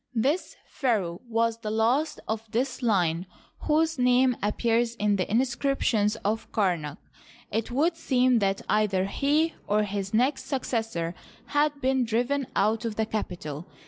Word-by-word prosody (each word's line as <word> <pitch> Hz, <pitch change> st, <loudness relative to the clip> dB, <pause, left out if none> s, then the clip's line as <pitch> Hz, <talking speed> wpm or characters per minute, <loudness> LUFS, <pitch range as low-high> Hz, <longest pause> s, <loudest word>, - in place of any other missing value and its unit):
This 275 Hz, +10 st, 0 dB
pharaoh 205 Hz, -, -1 dB
was 230 Hz, 0 st, +1 dB
the 220 Hz, -2 st, -4 dB
last 235 Hz, +8 st, +1 dB
of 220 Hz, 0 st, -3 dB
this 255 Hz, +3 st, -1 dB
line 180 Hz, -6 st, +1 dB, 0.4 s
whose 315 Hz, -1 st, +2 dB
name 250 Hz, 0 st, +4 dB
appears 230 Hz, +3 st, +1 dB
in 205 Hz, -2 st, +1 dB
the 185 Hz, -, -1 dB
mscriptions 240 Hz, -3 st, +1 dB
of 220 Hz, +2 st, -1 dB
Kamak. 175 Hz, -8 st, 0 dB, 0.5 s
It 220 Hz, +1 st, -1 dB
would 305 Hz, +7 st, +1 dB
seem 255 Hz, -6 st, +2 dB
that 195 Hz, -1 st, 0 dB
either 200 Hz, -3 st, +2 dB
he 295 Hz, +9 st, +1 dB
or 210 Hz, +1 st, +2 dB
his 200 Hz, -1 st, -3 dB
next 260 Hz, +4 st, +1 dB
successor 225 Hz, -, -2 dB, 0.4 s
had 290 Hz, 0 st, +1 dB
been 265 Hz, -1 st, +2 dB
driven 245 Hz, +4 st, 0 dB
out 220 Hz, +2 st, +2 dB
of 225 Hz, -2 st, -3 dB
the 220 Hz, -, 0 dB
capital. 175 Hz, -7 st, -5 dB
225 Hz, 145 wpm, -27 LUFS, 205-260 Hz, 0.5 s, name